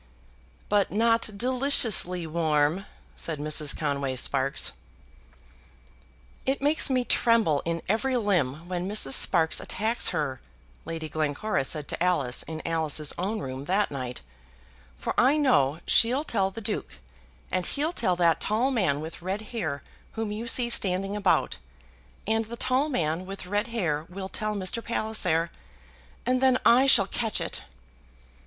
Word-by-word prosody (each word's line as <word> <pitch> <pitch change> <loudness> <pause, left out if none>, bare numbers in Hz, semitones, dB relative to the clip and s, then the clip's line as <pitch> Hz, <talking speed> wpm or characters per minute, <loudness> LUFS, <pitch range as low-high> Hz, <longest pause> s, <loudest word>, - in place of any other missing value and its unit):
"But 205 -1 +1
not 230 +2 +2
deliciously 240 -8 +3
warm," 160 +2 0 0.3
said 160 -2 -3
Mrs. 150 0 0
Conway 140 -3 -2
Sparkes. 135 +2 +2 1.7
"It 270 +1 -1
makes 295 +2 +2
me 255 -2 0
tremble 225 - +2
in 165 0 -3
every 250 +6 0
limb 170 - -1
when 180 +1 -3
Mrs. 200 -10 +2
Sparkes 160 0 +4
attacks 220 +4 +1
her," 145 -6 -3 0.4
Lady 165 -1 -5
Glencora 155 +4 -2
said 150 +1 -3
to - - -4
Alice 145 -9 0
in 160 -1 -6
Alice's 155 -2 +1
own 205 +4 -2
room 130 +1 -6
that 195 +5 0
night, 130 -3 -6 0.8
"for - - -3
I 270 +5 +4
know 165 - +2
she'll 250 +5 +3
tell 195 -10 0
the 210 +4 -9
Duke; 210 - -4 0.5
and 185 - 0
he'll 305 +4 -1
tell 190 - 0
that 170 -2 +2
tall 230 +6 0
man 180 - 0
with 160 +2 -8
red 190 +4 -3
hair 155 - -3 0.3
whom 220 -2 -4
you 220 +3 -5
see 240 0 +3
standing 195 -1 0
about, 200 -3 +1 0.7
and 225 +1 0
the 235 +2 -8
tall 260 +6 0
man 170 - -2
with 195 -1 -8
red 205 +4 -1
hair 170 -10 -2
will 190 +1 -7
tell 215 +1 -3
Mr. 200 +4 0
Palliser, 215 -8 +1 0.7
and 255 0 +1
then 260 -1 +4
I 255 +3 +5
shall 210 -7 +6
catch 225 +2 0
it." - - -5
190 Hz, 145 wpm, -26 LUFS, 155-230 Hz, 1.7 s, shall